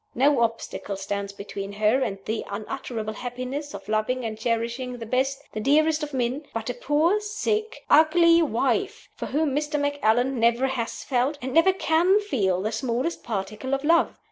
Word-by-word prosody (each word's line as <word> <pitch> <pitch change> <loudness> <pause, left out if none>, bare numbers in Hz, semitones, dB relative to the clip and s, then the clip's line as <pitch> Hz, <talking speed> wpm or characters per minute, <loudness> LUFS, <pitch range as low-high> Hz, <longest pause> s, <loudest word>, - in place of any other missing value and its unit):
No 275 0 +3
obstacle 230 -3 -2
stands 200 +1 -3
between 200 0 -7
her 215 +5 +2
and 210 -6 -1
"the 220 0 -2
unutterable 215 +1 -4
happiness 255 +5 -5
of - - -10
loving 220 +4 0
and 220 -1 -3
cherishing 235 +3 -2
the 230 - -7
best, 265 +4 0
the - - -3
dearest 310 +6 +3
of 300 -1 -4
men" 260 +3 -2
but 225 +2 -2
a - - -6
poor, 300 - +2
sick, 425 +1 -2
ugly 335 +2 +6
wife, 305 - -1
for - - -6
whom 295 -1 0
Mr. 295 0 -1
Macallan 265 -3 +1
never 235 +3 +3
has 255 -4 -3
felt, 265 +3 0
and 260 -1 -5
never 330 +4 +6
can 365 +2 +3
feel, 195 - 0
the 215 - -1
smallest 245 +8 -2
particle 215 +4 -3
of 275 - -5
love. 335 +3 +3
255 Hz, 170 wpm, -25 LUFS, 225-300 Hz, -, ugly